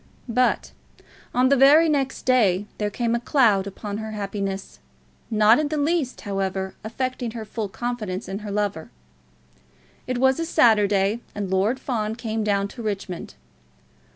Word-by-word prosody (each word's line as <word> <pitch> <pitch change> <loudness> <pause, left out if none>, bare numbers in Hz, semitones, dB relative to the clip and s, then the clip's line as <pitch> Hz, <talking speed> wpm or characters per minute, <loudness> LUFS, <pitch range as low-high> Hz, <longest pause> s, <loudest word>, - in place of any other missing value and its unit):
But 250 +2 +1 0.6
on 255 +1 +3
the 280 - +5
very 290 +5 +6
next 275 -3 -1
day 210 -7 +3
there 210 -1 0
came 235 +2 -1
a 235 - +1
cloud 225 -7 +3
upon 205 +1 -6
her 220 0 -6
happiness, 195 -1 -4 0.5
not 215 +2 +5
in 305 - 0
the 305 +1 -2
least, 295 -3 0
however, 195 -1 -2
affecting 250 +2 -3
her 220 - -5
full 215 -1 -4
confidence 215 -4 -4
in 195 +1 -4
her 210 -1 -7
lover. 200 -5 -2 1.2
It 255 -1 -1
was 265 +2 +3
a 330 - -1
Saturday, 210 - +3 0.2
and 200 -2 -3
Lord 205 +7 +1
Fawn 220 -5 -2
came 225 -2 -3
down 200 -1 +1
to 240 - -9
Richmond. 200 -5 -5
220 Hz, 155 wpm, -24 LUFS, 200-255 Hz, 1.2 s, very